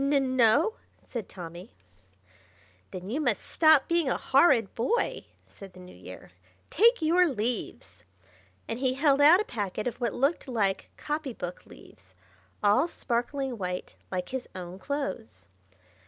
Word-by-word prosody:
"N 275 -2 +1
no!" 260 - +3 0.3
said 230 -6 -6
Tommy. 175 - -10 1.1
"Then 185 +2 -7
you 290 +6 -1
must 240 -8 0
stop 315 -4 +4
being 335 -4 +1
a - - 0
horrid 265 - +3
boy!" 475 - -1 0.2
said 195 -2 -13
the 185 - -14
New 180 0 -13
Year. 90 +1 -12 0.4
"Take 460 +1 +4
your 350 +3 +4
leaves!" 235 -4 -4 0.6
and 230 - -4
he 260 -1 0
held 280 0 +3
out 315 +6 +8
a - - +1
packet 205 -3 -4
of 245 0 -4
what 235 -4 -1
looked 280 +4 0
like 210 -6 -1
copy 295 -3 -4
book 180 -4 -7
leaves, - - -17 0.5
all 210 +10 +4
sparkling 255 -3 -3
white, 180 -1 -4 0.2
like 180 -1 -4
his 260 -1 -5
own 180 0 -8
clothes. 185 - -5
245 Hz, 145 wpm, -28 LUFS, 195-290 Hz, 1.1 s, out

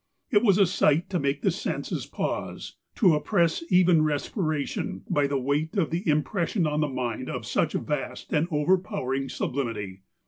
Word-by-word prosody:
J 215 - +5
r - - -7
was 200 -5 +5
a 200 - +6
sight 175 0 +2
to 180 - +1
make 140 0 -1
the - - +3
senses - - -3
pause; - - -4 0.2
to 185 -8 +5
oppress 165 +2 +1
even 180 -3 +5
respiration, 155 0 -2
by 145 -1 +2
the 140 0 0
weight 145 - -1
of 175 -5 +1
the 170 +1 -1
impression 170 +4 +1
on 150 0 0
the 150 - +2
mind 130 -1 -3
of 125 -3 -4
such 100 - 0
vast - - -3
and 150 +3 +2
overpowering 150 -5 0
sublimity. 110 -8 -3
150 Hz, 170 wpm, -26 LUFS, 140-180 Hz, 0.2 s, a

